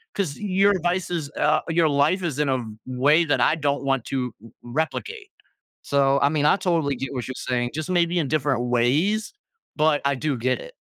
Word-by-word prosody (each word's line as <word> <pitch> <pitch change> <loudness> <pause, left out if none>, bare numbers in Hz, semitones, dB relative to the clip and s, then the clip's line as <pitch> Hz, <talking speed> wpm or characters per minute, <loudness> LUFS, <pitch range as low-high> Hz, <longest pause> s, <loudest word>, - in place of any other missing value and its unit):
'cause 180 -8 -2
your 200 0 +2
advice 175 +1 -1
is" 160 -5 -3
uh, 155 +1 +2
"your 165 -1 +3
life 145 +6 +2
is 155 -5 -3
in 150 - +1
a 130 -1 +1
v 120 - -6 0.2
way 145 +6 +3
that 145 - +1
I - - +3
don't 145 -3 -1
want 135 -3 0
to 125 -3 -2
r 115 - -12
replicate." 390 - -4 0.5
So, 140 -1 +2
I 140 - +5
mean, 150 -1 0
I 150 - +5
totally 165 -7 0
get 135 +1 -5
what 125 -3 -4
you're 130 - -5
saying, 120 -1 0
just 155 0 -4
maybe 175 -1 +2
in 160 - 0
different 145 -4 0
ways? 150 - +1 0.4
But 155 -1 +2
I 140 0 +2
do 145 +1 -1
get 130 +2 -1
it. - - -11
150 Hz, 210 wpm, -23 LUFS, 135-170 Hz, 0.5 s, I